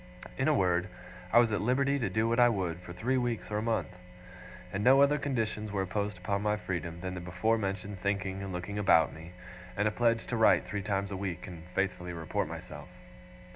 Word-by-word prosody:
In 130 - 0
a 155 - +5
word, 90 -4 +2 0.4
I - - +5
was 120 -2 +6
at 105 - 0
liberty 140 +4 +2
to 115 - -1
do 110 +1 +1
what 115 +1 +1
I 120 0 +7
would, 90 -6 -2
for 90 -1 -10
three 120 +9 0
weeks 120 -3 -2
or 105 - 0
a - - -2
month; 115 -3 0 0.8
and 100 +1 -1
no 130 +3 +7
other 145 +1 +4
conditions 110 -6 -2
were 100 -1 0
imposed 100 +1 -2
upon 100 +2 -2
my 105 0 +1
freedom 85 -4 -4
than 95 0 -4
the 90 - -5
before 90 +6 0
mentioned 100 -1 -4
thinking 95 -1 -1
and 100 -1 -5
looking 90 +3 -4
about 95 -5 +4
me, 80 +2 -11 0.4
and 105 +1 +2
a - - +1
pledge 115 0 +2
to 120 - -3
write 110 - +5
three 105 0 -3
times 100 0 -2
a 95 - -3
week 95 -4 -4
and 85 -2 -9
faithfully 90 -2 -1
report 80 -2 -2
myself. - - -8
100 Hz, 215 wpm, -30 LUFS, 90-115 Hz, 0.8 s, I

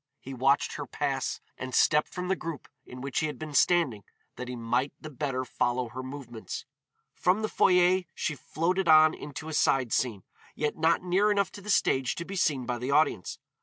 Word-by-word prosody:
He 135 - -8
watched 135 +2 +2
her 145 -2 -5
pass, 135 -2 -2 0.2
and 130 -1 -4
stepped 150 0 +3
from 180 0 -4
the 190 - +1
group 165 -5 -6 0.2
in 125 0 -9
which 140 -1 -2
he 155 - 0
had 150 - -6
been 155 -2 -7
standing 145 - +3 0.3
that 125 - -6
he 125 - -5
might 120 +4 -1
the 155 - -9
better 135 -2 -2
follow 125 -1 -1
her 125 +3 -6
movements. 130 -4 -7 0.5
From 185 +4 +1
the - - +1
foyer 180 -2 +4
she 160 - -2
floated 170 +6 -1
on 155 0 +7
into 150 +2 -8
a 160 - -5
side 130 -5 +2
scene, 110 -7 0 0.3
yet 150 -1 -1
not 160 +2 +2
near 190 +4 +2
enough 200 -2 +1
to 205 - -10
the 210 - -9
stage 130 -10 +2
to 170 - -5
be 195 - -6
seen 145 -8 +1
by 120 0 -2
the 125 +2 -4
audience. 140 - +1
145 Hz, 205 wpm, -28 LUFS, 130-170 Hz, 0.5 s, on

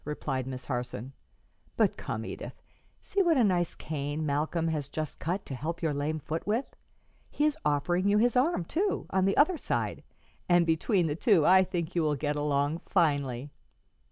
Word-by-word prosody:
replied 135 -3 -3
Miss 130 -1 -6
Harson. 125 -1 -4 0.6
"But - - +3
come, - - -5
Edith; - - -7 0.4
see 400 - 0
what 340 -5 +3
a 250 - +5
nice 180 -5 +1
cane 150 0 -3
Malcolm 155 +3 0
has 150 -4 -2
just 155 +1 -5
cut 180 +5 -2
to - - -6
help 165 +6 -4
your 155 -2 +1
lame 145 +2 -1
foot 155 +4 -5
with. 225 +6 -1 0.5
He 295 - 0
is 305 -1 +2
offering 175 +6 +1
you 205 +1 +4
his 235 +2 +3
arm, 255 - +2
too, 390 - -1
on 190 0 +2
the 195 - +1
other 310 +3 +4
side, - - -2 0.5
and 175 -1 +5
between 170 +3 +2
the 150 -2 -1
two 180 - +3
I 190 +1 +7
think 175 -2 -3
you 170 - +1
will 150 -2 +1
get 145 +1 -1
along 145 +1 0
finely." 145 - +1
160 Hz, 185 wpm, -29 LUFS, 145-190 Hz, 0.6 s, I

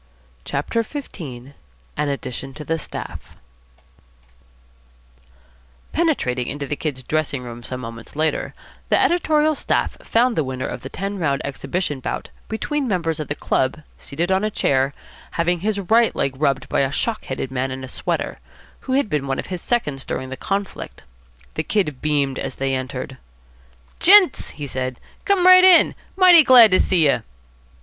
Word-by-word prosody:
CHAPTER 145 +11 -1
XV 280 +5 -7
AN 130 -3 -8 0.4
ADDITION 135 -2 -4
TO 150 - -8
THE 165 +2 -1
STAFF - - -8 2.6
Penetrating 130 - 0
into 145 0 -4
the 150 - -3
Kid's 140 -4 -4
dressing 145 -2 -2
room 120 -1 -8
some 130 +1 -6
moments 115 +1 -9
later, 155 +1 -1 0.3
the - - +4
editorial 310 -3 +2
staff - - -1
found 240 +1 +2
the 160 - +1
winner 130 -1 -4
of - - -5
the 130 - -8
ten 195 +4 -4
round 140 -5 0
exhibition 140 +2 -3
bout - - -4 0.2
between 275 +5 -2
members 165 -6 -1
of 155 - -4
the 145 - -3
club 135 +3 -1 0.2
seated 170 +6 -3
on 190 +2 +2
a 215 - +1
chair, 135 -8 0 0.4
having 175 +1 0
his 205 +2 -1
right 225 +4 +3
leg 135 - 0
rubbed 135 -2 0
by - - 0
a 135 -1 +1
shock 220 +8 -2
headed 130 0 -4
man 130 0 -1
in 130 0 -6
a - - -6
sweater, - - -3 0.4
who 260 - -4
had 275 -3 +2
been 150 -7 -2
one 135 0 -1
of - - -4
his 175 - -4
seconds 150 - -1
during 130 0 -4
the 130 - -5
conflict. 195 +6 -4 0.5
The - - -1
Kid 150 -11 -1
beamed 145 -3 0
as - - -4
they 135 0 -1
entered. 130 0 -5 0.8
"Gents," 375 -4 +6
he 145 - -7
said, 130 -2 -4 0.3
"come 395 -3 +2
right 370 0 +9
in. 370 -2 +7 0.2
Mighty 365 -3 +8
glad 245 -5 +8
to 185 - +5
see 175 -5 +3
you." 140 - +2
150 Hz, 165 wpm, -21 LUFS, 135-215 Hz, 2.6 s, right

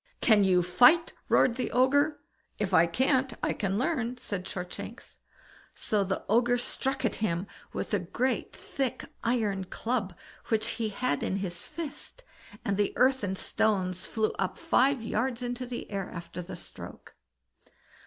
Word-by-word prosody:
"Can 215 -4 +5
you 180 -2 +4
fight?" 245 - +5 0.2
roared 235 -1 +4
the 255 - -2
Ogre. 285 +4 +3 0.4
"If 200 -2 -2
I 170 -1 +6
can't, 260 - +2
I - - +2
can 195 -1 -1
learn", 250 -3 0
said 200 -6 -5
Shortshanks. 180 -1 -7 0.6
So 210 -2 0
the 190 0 -3
Ogre 240 +3 +3
struck 265 +2 -1
at 220 - +1
him 180 -3 0 0.3
with - - -4
a 205 - +3
great 240 +9 -1
thick 265 -3 -3 0.2
iron 215 -5 0
club 210 -2 -2 0.3
which 220 -1 +1
he 220 - +1
had 210 - -1
in - - -1
his 180 -3 -3
fist, 330 - -6 0.4
and 200 -1 0
the 205 -1 +1
earth 260 +1 +3
and 190 -1 -1
stones 185 -5 0
flew 220 -1 0
up 190 - -1
five 265 -2 +3
yards 235 +2 -1
into 245 +1 -3
the 240 -2 -6
air 195 -2 -3
after 170 +1 -7
the 180 - -7
stroke. - - -10
220 Hz, 155 wpm, -29 LUFS, 190-255 Hz, 0.6 s, I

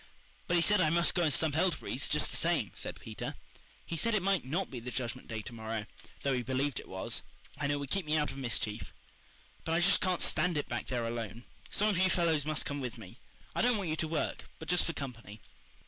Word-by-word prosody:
"But 175 - +2
he 170 - +5
said 210 0 +5
I 155 - +4
must 170 +2 +3
go 175 - +2
and 160 -3 +3
stump 150 +1 +2
elderberries 175 +2 +1
just - - +1
the - - -6
same" - - +1
said - - -5
Peter. - - -5 0.5
"He 165 - -4
said 230 +6 +1
it 195 - +2
might 195 -2 +3
NOT 165 +9 -1
be 125 - -4
the 120 +2 -6
Judgment 120 -2 -3
Day 110 -2 -4
to 125 - -7
morrow, 110 -1 -3 0.4
though 140 - +2
he 125 - +1
believed 130 +3 0
it - - -10
was, 95 0 0 0.4
and 145 -1 +1
it - - +2
would 140 -1 -4
keep 195 -5 0
me 155 +1 +3
out 150 -1 +1
of - - -8
mischief. 115 -4 -2 0.7
But 160 - -1
I 165 - +4
just 195 +3 +5
can't 185 -3 +2
stand 180 -3 +2
it 145 - -1
back - - -3
there 120 -2 -1
alone. 115 -1 -4 0.3
Some 210 +1 +4
of 190 -4 +2
you 185 0 +5
fellows 160 -5 +3
must 155 -1 +1
come 145 0 -2
with 125 -2 -4
me. 110 +2 -11 0.3
I - - +1
don't 245 -1 +4
want 195 -5 -2
you - - +1
to 160 - 0
work, 155 0 -2
but 160 - -9
just 180 0 +4
for 165 - -1
company." 115 -7 -6
150 Hz, 245 wpm, -32 LUFS, 120-175 Hz, 0.7 s, he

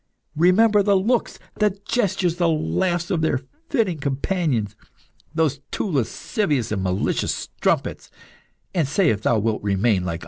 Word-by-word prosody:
Remember 205 +6 +5
the 200 0 +3
looks, 230 +6 0 0.2
the 205 -2 +1
gestures, 190 -7 0
the 175 -1 +2
laughs 175 +2 0
of 170 -4 +1
their 150 -5 +1 0.3
fitting 210 - 0
companions, 140 - -1 0.6
those 155 -4 +1
two - - -2
lascivious 145 - -1
and 100 -3 -1
malicious 95 0 0
strumpets, - - -2 0.6
and 165 -6 +1
say 170 +4 +3
if 105 -1 -2
thou 115 - +2
wilt 110 0 0
remain 100 -1 +1
like 90 - -2
unto - - -3
them." - - -7
160 Hz, 150 wpm, -22 LUFS, 115-190 Hz, 0.6 s, Remember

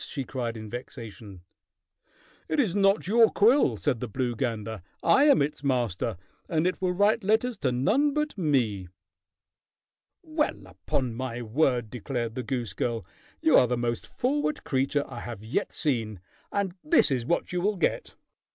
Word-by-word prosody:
she 140 - -4
cried 120 -3 -4
in 110 0 -7
vexation. 110 -5 -8 1.1
"It 310 - 0
is 210 -10 +2
not 195 -1 +3
your 225 +2 +6
quill," 240 +8 +4
said 135 -6 0
the 125 - -4
blue 120 +2 -2
gander. 110 -3 -3 0.2
"I 280 - +5
am 285 - +5
its 145 0 -4
master, 120 -6 0 0.3
and 160 -1 +1
it 185 - -1
will 185 -1 +1
write 205 +4 +2
letters 225 +4 +2
to 130 - +1
none 250 - +2
but 300 0 -1
me." 125 - 0 1.4
"Well, 310 -2 -2
upon 125 -3 -3
my 120 0 -4
word!" 120 -2 +1
declared 120 -1 -3
the 130 - -3
goose 120 -7 -3
girl. 115 +3 -2 0.4
"You 320 -1 +4
are 125 - +4
the 125 +1 0
most 120 -1 -2
forward 290 +4 -1
creature 135 +1 0
I 125 -3 -8
have 115 -4 -7
yet 110 - -2
seen, 115 - -1 0.3
and 200 -3 -1
this 305 - +4
is 125 -3 0
what 170 - 0
you 180 - 0
will 205 +2 0
get." 170 - -1
135 Hz, 165 wpm, -27 LUFS, -, 1.4 s, your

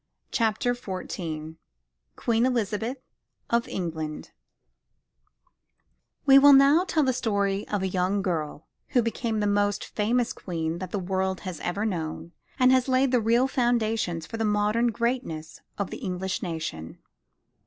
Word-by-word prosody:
CHAPTER 230 +2 +1
XIV 170 -8 -6 0.6
QUEEN 230 0 +1
ELIZABETH 225 +1 -1 0.5
OF 235 0 +2
ENGLAND 160 -4 -4 1.9
We 275 -1 +8
will 285 +1 +8
now 280 +6 +6
tell 315 -5 +1
the 260 -1 +2
story 200 -4 -1
of 205 -2 -2
a - - +1
young 190 +2 0
girl 155 -5 -3 0.3
who 240 - +5
became 230 -1 -2
the - - +1
most 205 0 +1
famous 230 +3 0
Queen 165 -2 -4
that 185 -1 -5
the 205 - -3
world 190 0 -1
has 185 -5 -6
ever 200 +5 -2
known 165 -4 -4 0.3
and 255 0 +4
laid 260 0 +3
the 250 -2 +3
real 235 +4 +3
foundations 225 -9 0
for 225 - -6
the 225 - -1
modern 210 +2 +2
greatness 235 -9 -3 0.2
of 200 - -3
the - - -5
English 185 +1 -3
nation. 160 - -5
205 Hz, 140 wpm, -26 LUFS, 180-240 Hz, 1.9 s, We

